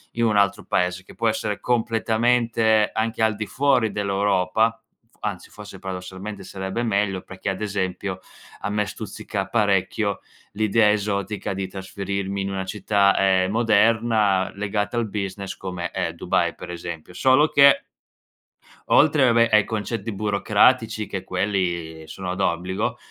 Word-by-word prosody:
in 115 0 +1
un 110 -2 +2
altro 100 -1 +2
paese, 90 +1 0
che - - -14
può 115 -1 +1
essere 105 -2 -2
completamente 115 -1 +2
anche 110 0 -1
al 110 -1 +2
di 105 - -3
fuori 130 -5 +2
dell'Europa, 100 +2 +1 0.3
f - - -31
anzi, 100 -5 -4
forse, 105 -2 -11
paradossalmente 95 +2 -7
sarebbe 95 +4 -4
meglio, 100 -4 0
perché 95 +1 -9
ad 95 - -4
esempio 95 -2 -3 0.4
a - - -3
me 105 0 0
stuzzica 105 -1 -5
parecchio 100 -1 +1 0.3
l'idea 110 0 +3
esotica 100 -1 -2
di 95 0 -3
trasferirmi 100 +1 -4
in 95 - -2
una 95 -1 -3
città, 100 0 +2
ehm, 95 -1 +3
moderna 110 -3 +2
legata 105 +2 -2
al 115 -1 0
business, 100 -2 -4
come 90 -2 -5
è - - -2
Dubai - - 0
per - - -10
esempio. 85 0 -7
Solo 130 +8 +4
che 140 -2 +6 1.1
oltre, 150 -2 +5
vabbè, 115 -1 +4
ai 105 -1 +6
concetti 110 0 -3
burocratici 105 +2 +2
che 95 - -5
quelli 90 -4 -2
sono 90 +2 -5
d'obbligo, 90 +2 -1
100 Hz, 140 wpm, -23 LUFS, 95-110 Hz, 1.1 s, che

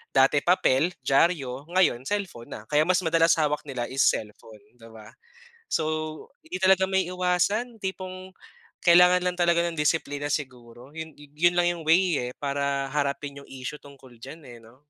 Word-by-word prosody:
dati 135 +2 +4
papel, 170 -3 +2 0.2
dyaryo, 140 -2 +1
ngayon 180 -10 +2
cellphone 190 -13 -4
na. - - -7
Kaya 150 0 +3
mas 185 0 +3
madalas 165 0 +4
hawak 150 -1 0
nila 125 -3 -4
is 135 +1 +1
cellphone, 105 0 -6 0.2
'di 115 0 -14
ba. 110 -1 -13 0.6
So 160 - 0 0.6
hindi 185 - -4
talaga 190 0 +5
maiiwasan, 185 +5 0
tipong 185 0 -6 0.5
kailangan 180 +1 +6
lang 180 0 -1
talaga 170 -1 +3
ng 165 -2 -6
disiplina 145 -1 -1
siguro. 125 -3 -6
Yun 160 -1 -7
yu 145 -1 -15 0.2
yun - - -8
lang 175 0 +3
yung 165 - -9
way 175 -1 +3
eh - - -15
para 140 -1 -2
harapin 140 -1 -2
yung - - -15
issue 135 +3 -7
tungkol 135 -3 -16
diyan 155 +5 -10
eh 120 -1 -11
'no. 115 +3 -18
150 Hz, 165 wpm, -25 LUFS, 135-180 Hz, 0.6 s, kailangan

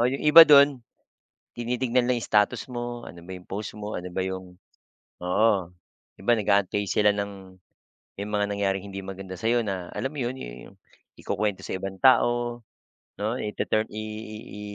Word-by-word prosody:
Oh, 120 - +4
yung 135 +2 -3
iba 160 +2 +10
dun, 140 -2 +7 0.7
tinitignan 120 +1 0
lang 125 - +3
yung 115 - -4
status 105 +2 +2
mo, 120 0 -5
ano 85 - -10
ba 95 - -8
'yong 90 - -16
post 105 +2 -5
mo? 105 0 -6
Ano 90 - -7
ba 95 +1 -2
'yong 95 -1 -6 0.7
oo, 100 +6 +3 0.7
'di - - -15
ba, 120 - +5
nag-aantay 100 0 +1
sila 105 -1 +4
ng 100 -2 -6 0.6
yung 105 +1 -5
mga 105 0 +2
nangyaring 100 -1 -1
hindi 95 - -5
maganda 95 -1 -7
sa'yo 115 +6 +1
na 95 -5 -4
alam - - -2
mo - - -5
yun 120 +2 -3
yu - - -9
yung - - -22 0.4
ikukuwento 105 -3 -2
sa - - -4
ibang 95 0 -6
tao, 120 -2 +3 0.6
'no. 110 +3 -1
Ituturn 110 +1 -1
i 110 0 -4 0.2
i 110 0 -8 0.2
i - - -8
105 Hz, 180 wpm, -26 LUFS, 95-120 Hz, 0.7 s, iba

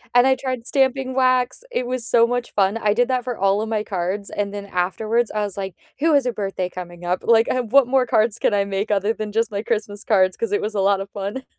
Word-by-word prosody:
and 245 +1 +6
I 265 0 +4
tried 255 -3 -4
stamping 265 -1 +1
wax, 255 - +1
it 250 - -2
was 250 -1 -3
so 230 -1 +5
much 245 0 -3
fun, 200 +2 +2
I 210 -2 +1
did 245 +3 +1
that 255 -1 0
for 245 -2 -3
all 195 +1 +2
of 220 - -3
my 220 -1 -1
cards, 195 +1 -3
and 200 -1 -3
then 205 -1 -6
afterwards, 215 +5 -1
I 210 0 -2
was 205 -2 -5
like, 190 -3 -5 0.2
"Who 320 +2 +3
has 280 -3 +3
a 250 - +1
birthday 195 -4 -3
coming 175 -1 -9
up?" 180 +1 0
Like, 230 -1 +4
"I 255 - 0
what 250 +3 +4
more 260 0 +2
cards 225 -1 +1
can - - +1
I 200 -1 +2
make 200 +1 -3
other 205 +1 +1
than 215 -2 -5
just 225 +1 0
my 200 -1 -2
Christmas 210 -2 -3
cards?" 185 -3 +3
'Cause 225 -3 -2
it 205 - +1
was 210 +1 -3
a 205 - -1
lot 195 0 +2
of 195 - -7
fun. 205 +6 -5
215 Hz, 265 wpm, -21 LUFS, 200-245 Hz, 0.2 s, and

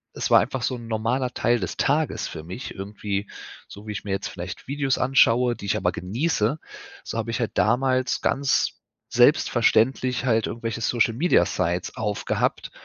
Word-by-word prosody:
Es - - -2
war - - +7
einfach 130 - -2
so 130 +1 -1
'n 120 -2 -9
normaler 115 +3 -1
Teil 120 +2 +1
des 95 -5 -4
Tages 150 +2 0
für 80 - -8
mich 95 - -7
irgendwie, 100 0 -4 0.4
so 105 +2 -12
wie - - -3
ich 100 - -6
mir 100 - -5
jetzt 95 - -2
vielleicht 90 0 -8
Videos 140 -1 0
anschaue, 125 -2 +4
die - - -9
ich 100 - 0
aber - - +1
genieße, 115 - -1 0.4
so - - -5
habe 115 0 -2
ich - - -2
halt 115 - -1
damals 130 +3 +2
ganz 140 0 +1 0.3
selbstverständlich 125 +2 +3
halt 115 -3 +2
irgendwelche 115 0 -4
Social 115 0 +2
Media 165 +9 +3
Sites 90 -1 -2
aufgehabt 105 -2 -1
115 Hz, 175 wpm, -24 LUFS, 105-130 Hz, 0.4 s, war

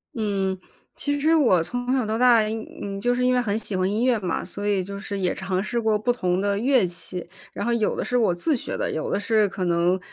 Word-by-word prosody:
嗯， 195 -4 -1 0.4
其 285 0 -1
实 315 +3 +3
我 240 - +4
从 245 +7 -3
小 255 -4 +1
到 220 +1 -2
大， 245 -2 +6
嗯， 205 -2 -5
就 245 +3 +2
是 250 - 0
因 255 - +3
为 250 - +3
很 210 -3 -1
喜 210 -2 -3
欢 185 +1 +1
音 225 +4 0
乐 245 -3 +3
嘛， 180 -4 -2
所 205 +1 -5
以 195 -3 +1
就 200 +1 -7
是 200 -1 -5
也 185 -2 0
尝 190 0 -2
试 235 +3 -2
过 220 -1 +2
不 245 +4 +1
同 180 -6 0
的 200 0 0
乐 255 -3 +3
器。 180 0 -4 0.3
然 - - -4
后 235 - +1
有 225 -3 +1
的 - - -3
是 250 - -2
我 215 -7 +3
自 285 - 0
学 - - -4
的， - - -1
有 155 - -3
的 - - 0
是 215 0 +2
可 185 - -4
能， 175 +1 +2
210 Hz, 275 characters per minute, -24 LUFS, 190-245 Hz, 0.4 s, 大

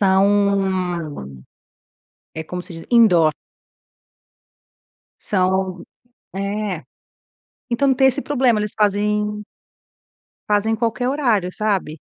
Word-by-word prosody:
São, 190 - +1 1.0
é 160 - -5
como 180 +3 -6
se - - -11
diz, 165 0 -10
indoor. 180 -10 +5 1.9
São 185 -2 -1 0.5
é, 200 -3 -3 0.9
então 265 +3 +2
tem 265 +1 +4
esse 265 +2 +1
problema 255 -6 +2
eles 210 -1 -3
fazem 210 0 0 1.0
fazem 210 +2 +1
qualquer 230 +2 -1
horário, 235 -10 +1
sabe. 195 -8 -2
205 Hz, 90 wpm, -20 LUFS, 185-220 Hz, 1.9 s, indoor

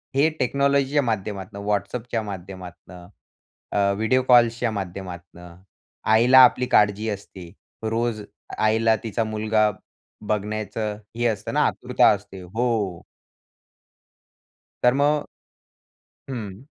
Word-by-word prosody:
हे 145 +4 +4
टेक्नॉलॉजीच्या 140 +2 +2
माध्यमातनं 100 -2 -4
WhatsAppच्या 110 +3 -2
माध्यमातनं, 90 -2 -9 0.6
अ, 100 -1 +2
व्हिडिओ 110 +5 +2
कॉल्सच्या 120 -1 +4
माध्यमातनं, 90 -3 -8 0.6
आईला 120 +4 +6
आपली 125 0 +4
काळजी 105 +1 +3
असते. 95 -4 -8 0.3
रोज 115 0 -1 0.4
आईला 110 +1 +3
तिचा 115 +1 -1
मुलगा, 110 0 +1 0.6
बघण्याचं 105 0 -3 0.2
हे 120 +1 -1
असतं 105 -3 -3
ना, - - +2
आतुरता - - +2
असते. 100 -2 -3
हो. 105 -2 -2 1.8
तर 125 - +5
मग 145 +2 +2 1.1
हं. 110 -4 -6
110 Hz, 95 wpm, -23 LUFS, 100-120 Hz, 1.8 s, आईला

